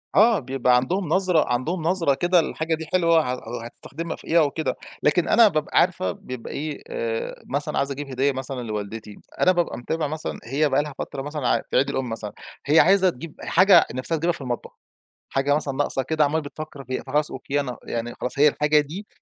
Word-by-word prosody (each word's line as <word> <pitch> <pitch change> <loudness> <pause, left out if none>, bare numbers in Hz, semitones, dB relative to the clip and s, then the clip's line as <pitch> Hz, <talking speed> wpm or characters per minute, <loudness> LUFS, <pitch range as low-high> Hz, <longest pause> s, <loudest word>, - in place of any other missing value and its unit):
آه، 220 0 +6
بيبقى 130 -2 +1
عَندهم 170 +10 0
نظرة، 180 -2 +3
عَندهم 160 +9 -1
نظرة 165 -4 +2
كده 175 +5 +3
الحاجة 160 0 -1
دي 160 0 -7
حلوة 165 -5 +2
ه 120 -2 -6
هتستخدمها 165 +7 -6
في - - -16
إيه 170 - +4
أو 150 -3 +3
كده، 160 +1 -2 0.3
لكن 160 +3 +3
أنا 230 -1 +6
بابقى 155 -6 +1
عارفة 170 - +1
بيبقى 125 +6 -8
إيه 150 +1 -5
آآ 485 0 -3
مثلًا - - -2
عايز 140 0 0
أجيب 145 +1 -5
هدية 135 +2 +1
مثلًا 130 -1 -5
لوالدتي 105 -1 -6 0.2
أنا 185 - +6
بابقى 175 -2 0
متابع 155 +5 -2
مثلًا 155 +2 -5
هي 145 +5 +1
بقى 135 +2 +2
لها 150 -1 -7
فترة 135 - -4
مثلًا 145 -2 -3
ع - - +2
في - - +1
عيد 135 +2 +3
الأم 130 -3 -2
مثلًا 110 -2 -5 0.3
هي 150 +3 +5
عايزة 190 0 +5
تجيب 165 0 -9
إ - - -7
حاجة 190 +3 +6
نِفْسها 130 +6 -2
تجيبها 170 +3 +1
في - - -10
المطبخ، 125 -3 -4 0.6
حاجة 135 +1 +1
مثلًا 145 -3 -2
ناقصة 135 -1 0
كده 155 +3 +1
عمّالة 150 +3 +1
بتفكّر 145 -1 -8
فيها، 130 0 -4
فخلاص 150 +3 0
أوكي، 135 +2 -2
أنا 125 -4 -4
يعني 120 +1 -4
خلاص 125 - -4
هي 150 +1 +7
الحاجة 150 +1 +3
دي 165 +8 -7
150 Hz, 210 wpm, -24 LUFS, 130-165 Hz, 0.6 s, هي